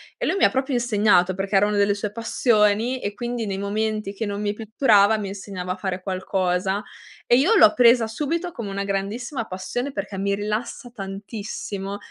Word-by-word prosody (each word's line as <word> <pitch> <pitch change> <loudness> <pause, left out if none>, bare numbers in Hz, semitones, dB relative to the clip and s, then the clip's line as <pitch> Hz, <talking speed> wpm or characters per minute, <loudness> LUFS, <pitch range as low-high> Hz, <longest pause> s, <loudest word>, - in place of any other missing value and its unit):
e - - -3
lui - - +1
mi - - +6
proprio 265 0 -1
insegnato, 210 -6 +3
perché 195 +2 -3
erano 205 +2 +3
delle 205 0 +3
sue 205 0 -4
passioni, 230 +1 +1
e 205 0 -4
quindi 240 -1 -3
nei 195 -1 -3
momenti 210 0 -2
che 215 +2 -4
non 200 0 -3
mi 205 -1 -1
pitturava, 220 -1 +3
mi 205 -2 -4
insegnava 195 -2 -6
a - - -1
fare 185 -1 -4
qualcosa; 190 +1 -1 0.4
e 240 - +4
io 325 - +4
l'ho 215 - +7
presa 240 -1 +5
subito 315 +10 -3
come 230 -9 -6
una 200 0 -3
grandissima 210 +6 -3
passione, 190 +9 -4
perché 200 -7 -5
mi 200 0 0
rilassa 215 +4 -4
tantissimo. 200 -1 -6
205 Hz, 180 wpm, -23 LUFS, 195-235 Hz, 0.4 s, l'ho